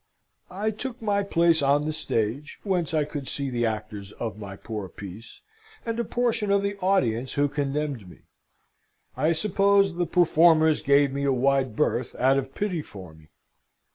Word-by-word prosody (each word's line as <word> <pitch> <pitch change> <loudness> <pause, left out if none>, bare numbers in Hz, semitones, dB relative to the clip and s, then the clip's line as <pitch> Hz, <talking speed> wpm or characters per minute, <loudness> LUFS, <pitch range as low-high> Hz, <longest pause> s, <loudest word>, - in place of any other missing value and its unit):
I 205 +4 -2
took 245 +3 -6
my 205 -2 0
place 170 -4 +2
on 145 +1 +2
the 155 - -2
stage, 140 -1 -2
whence 180 -6 -1
I 155 -2 +1
could 145 -2 -6
see 140 0 -3
the 120 -1 0
actors 105 -2 -5
of 110 -5 -5
my 100 -2 -7
poor 105 -2 -6
piece, 100 +4 -11 0.4
and 230 0 -3
a - - +1
portion 235 -2 -1
of 200 0 +2
the 200 0 -1
audience 130 - +1
who 145 0 +2
condemned 140 -6 -3
me. - - -16 0.9
I 150 +5 +1
suppose 195 +2 +2
the 175 0 -1
performers 160 -2 +4
gave 140 -1 +3
me 140 0 -2
a 140 - +2
wide 130 -2 +1
berth 120 +3 -1
out 135 +2 +3
of 135 0 -7
pity 185 -6 -2
for 95 - -11
me. 80 -1 -19
145 Hz, 170 wpm, -25 LUFS, 120-185 Hz, 0.9 s, performers